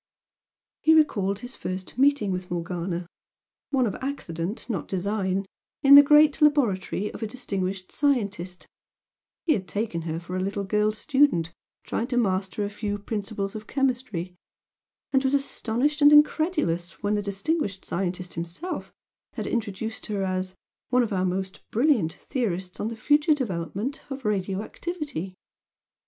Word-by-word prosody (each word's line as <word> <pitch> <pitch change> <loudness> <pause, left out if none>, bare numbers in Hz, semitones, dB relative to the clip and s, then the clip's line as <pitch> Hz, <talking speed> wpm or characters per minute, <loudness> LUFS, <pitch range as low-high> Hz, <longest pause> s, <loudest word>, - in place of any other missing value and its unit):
He 320 - +6
recalled 200 -11 +2
his 245 +1 -8
first 185 +5 -5
meeting 275 -7 +4
with 180 0 -4
Morgana, 175 0 -3 0.6
one 265 -3 +2
of 210 - -1
accident, 200 - -4
not 205 -10 -3
design 195 0 -1 0.4
in 275 0 +8
the 285 - +13
great 295 +1 +5
laboratory 215 -9 +2
of - - -9
a 220 - -1
distinguished 195 -5 -3
scientist, 205 - -1 0.8
he 320 - +4
had 190 -6 -3
taken 205 -5 -2
her 160 0 -3
for 175 +2 -6
a - - 0
little 200 +2 -2
girl 210 +2 +2
student 215 - +2 0.3
trying 235 - -2
to 250 -2 -1
master 195 -2 0
a - - -3
few 205 0 -3
principles 205 -1 -3
of 215 -1 -7
chemistry, 245 -10 -1 0.8
and 265 0 +4
was 265 +1 +3
astonished 280 +2 0
and 290 0 +8
incredulous 300 - +3
when 205 +1 +1
the 210 - +1
distinguished 200 - -2
scientist 180 -1 -3
himself 175 - -5 0.4
had - - -4
introduced 220 -1 -3
her 205 -2 -1
as 185 0 -2 0.3
"one 250 0 +4
of 225 -3 -2
our 185 -1 +1
most 190 +1 -3
brilliant 230 - +2
theorists 190 -4 -3
on 210 - -1
the 230 - -4
future 295 +6 +3
development 210 - -3
of 270 -2 -6
radio 195 -1 0
activity." 285 - -5
205 Hz, 145 wpm, -26 LUFS, 185-265 Hz, 0.8 s, the